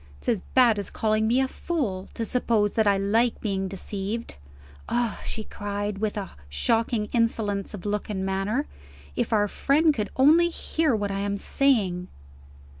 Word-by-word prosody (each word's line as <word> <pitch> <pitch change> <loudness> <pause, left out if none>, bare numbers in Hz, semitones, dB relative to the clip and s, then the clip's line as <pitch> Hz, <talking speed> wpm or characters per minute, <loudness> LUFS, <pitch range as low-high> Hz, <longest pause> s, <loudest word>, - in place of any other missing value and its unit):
It's - - -15
as 225 -6 +1
bad 240 -5 +5
as 200 - -3
calling 215 0 +1
me 240 +3 +3
a 265 - +1
fool, 245 - -3
to 230 - -2
suppose 225 -4 +1
that 220 -2 +2
I 200 -1 +4
like 220 +5 +1
being 195 -3 -2
deceived. 200 +4 -5 0.5
Ah," 240 -2 -1
she 220 - -4
cried, 205 -1 -4
with 215 0 -1
a 195 -3 -4 0.2
shocking 225 - +1
insolence 220 -4 0
of 195 - -10
look 210 0 -2
and 190 -2 -2
manner, 195 +8 -1 0.5
"if - - -1
our 210 -2 +3
friend 300 +8 +3
could 210 -6 -2
only 320 +6 +5
hear 320 -5 0
what 205 -2 -2
I 195 - -2
am 200 0 -1
saying!" 200 -9 +1
215 Hz, 170 wpm, -26 LUFS, 200-240 Hz, 0.5 s, bad